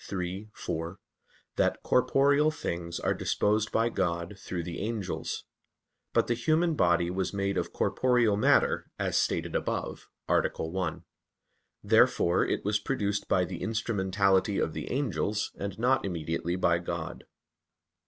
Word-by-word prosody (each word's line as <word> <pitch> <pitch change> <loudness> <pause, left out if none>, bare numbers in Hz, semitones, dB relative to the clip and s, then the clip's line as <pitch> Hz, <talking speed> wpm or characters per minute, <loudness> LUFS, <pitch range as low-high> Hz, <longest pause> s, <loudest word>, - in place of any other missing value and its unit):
iii, 95 +2 -4
4), 85 +4 -4 0.6
that - - +1
"corporeal 140 +4 +3
things 85 - -4
are - - +1
disposed 105 +1 0
by 115 +1 +2
God 85 -3 -2
through 90 -3 -5
the 85 0 -5
angels." 105 -3 -3 0.7
But - - +3
the 120 - +1
human 160 +8 +2
body 85 - +2
was 95 +1 -2
made 100 0 0
of - - -2
corporeal 125 -5 +2
matter, 105 - +3
as - - -1
stated - - 0
above - - -3 0.2
(A. - - +4
1). 85 0 -3 0.8
Therefore 85 +1 +4
it - - -2
was 105 +1 +2
produced 105 -4 -1
by 90 -1 +3
the 90 -1 -7
instrumentality 100 -3 +1
of 80 - 0
the - - -5
angels, 105 - -1
and 100 -1 -4
not 125 +3 +2
immediately 85 -1 -2
by 85 -2 +2
God. 85 -1 -5
100 Hz, 135 wpm, -29 LUFS, 85-115 Hz, 0.8 s, A